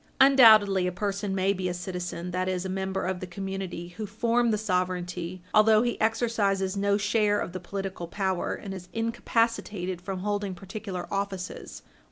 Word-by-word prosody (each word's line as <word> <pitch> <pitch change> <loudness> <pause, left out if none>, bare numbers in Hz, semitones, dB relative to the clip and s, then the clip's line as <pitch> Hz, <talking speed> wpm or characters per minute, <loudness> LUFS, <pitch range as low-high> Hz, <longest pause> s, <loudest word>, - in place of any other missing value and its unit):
Undoubtedly 215 -8 +7
a - - 0
person 200 +1 -2
may 195 +1 +2
be 185 -1 -2
a 175 - -3
citizen, 180 -1 -5
that 185 +1 -1
is, 185 0 -2
a - - -3
member 190 0 -2
of 185 0 -2
the 185 - -6
community 190 -2 -5
who 215 -1 -4
form 235 +3 +1
the 215 - +2
sovereignty, 180 -3 -2
although 215 +1 +6
he 240 -1 -2
exercises 215 -4 +1
no 200 0 +2
share 210 0 +2
of - - -3
the 185 - -5
political 190 -1 -5
power 190 0 -1
and 195 -2 -7
is 180 -1 -9
incapacitated 225 -5 -1
from 190 0 -4
holding 205 -1 -2
particular 190 0 -6
offices. 195 -2 -4
195 Hz, 170 wpm, -27 LUFS, 185-210 Hz, -, Undoubtedly